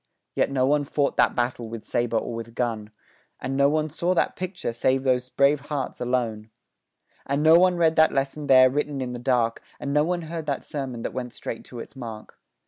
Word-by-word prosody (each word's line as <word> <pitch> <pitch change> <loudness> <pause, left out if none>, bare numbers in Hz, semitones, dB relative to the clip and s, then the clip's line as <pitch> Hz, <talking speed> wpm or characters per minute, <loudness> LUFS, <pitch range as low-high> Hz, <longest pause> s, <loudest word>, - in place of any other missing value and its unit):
Yet - - +1
no 130 -2 +1
one 145 +2 +2
fought 140 0 0
that - - +3
battle 120 -2 -2
with 115 -1 -7
saber 120 -1 0
or 115 - -3
with 115 0 -7
gun, 110 -4 -2 0.5
And 130 +1 -3
no 140 +1 +4
one 155 +1 +1
saw 170 +4 -1
that - - +1
picture, 180 -9 -4
save 130 +3 +1
those 125 -1 +1
brave 140 +2 +3
hearts 140 -4 -4
alone, 115 -3 -1 0.8
And 140 +2 0
no 160 +2 +7
one 180 0 +4
read 165 -1 +3
that 160 0 +6
lesson 140 +2 -2
there 130 -1 +7
written 145 0 -2
in 125 -1 -3
the 120 - -5
dark, 120 -2 +1 0.2
And 140 - -3
no 150 0 +4
one 175 +1 -1
heard 160 -1 -6
that 140 -2 -2
sermon 130 -5 -5
that - - -4
went 125 -2 -5
straight 115 - -6
to 125 - -11
its 115 - -9
mark. 115 -4 -9
135 Hz, 215 wpm, -25 LUFS, 120-150 Hz, 0.8 s, no